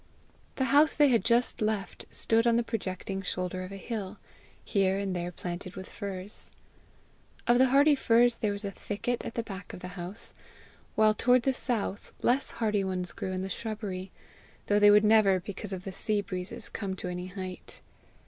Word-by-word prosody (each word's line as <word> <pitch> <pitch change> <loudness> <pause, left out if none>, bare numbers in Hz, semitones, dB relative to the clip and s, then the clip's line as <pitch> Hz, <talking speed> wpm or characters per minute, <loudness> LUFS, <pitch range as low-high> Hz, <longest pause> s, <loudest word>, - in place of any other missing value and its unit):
The 265 - +1
house 300 +2 +6
they 295 -2 +5
had 230 -6 +3
just 235 +1 +2
left 215 -2 -2
stood 230 +1 +2
on 235 - +4
the 235 - +3
projecting 195 -3 -4
shoulder 185 0 -3
of 185 - -8
a 195 - -6
hill, 205 -1 -5 0.5
here 195 -2 +2
and 195 -2 -2
there 175 0 -3
planted 180 +2 -6
with 190 -1 -7
firs. 195 0 -6 0.9
Of 240 +1 +4
the 260 - +6
hardy 285 +3 +5
trees 240 -2 +4
there 210 - 0
was 200 +1 -3
a 200 - -2
thicket 225 +5 -3
at - - -6
the 230 - -1
back 195 -3 -8
of - - -8
the 180 - -6
house, 180 +3 -6 0.6
while 215 0 +5
toward 245 +3 +3
the 270 - +2
south, 225 -6 -2
less 260 +3 +2
hardy 215 -3 0
ones 185 -2 -2
grew 190 - -4
in 185 0 -2
the - - -3
shrubbery, 195 -2 -4 0.6
though 205 0 +3
they 205 0 +8
would 210 +1 +6
never, 210 -3 +5
because 200 +2 -6
of 185 -1 -4
the 195 - -5
sea 210 +2 0
breezes, 185 -1 -5
come 195 -3 -4
to 185 - -6
any 180 0 -4
height. 185 -1 -7
200 Hz, 190 wpm, -29 LUFS, 185-230 Hz, 0.9 s, they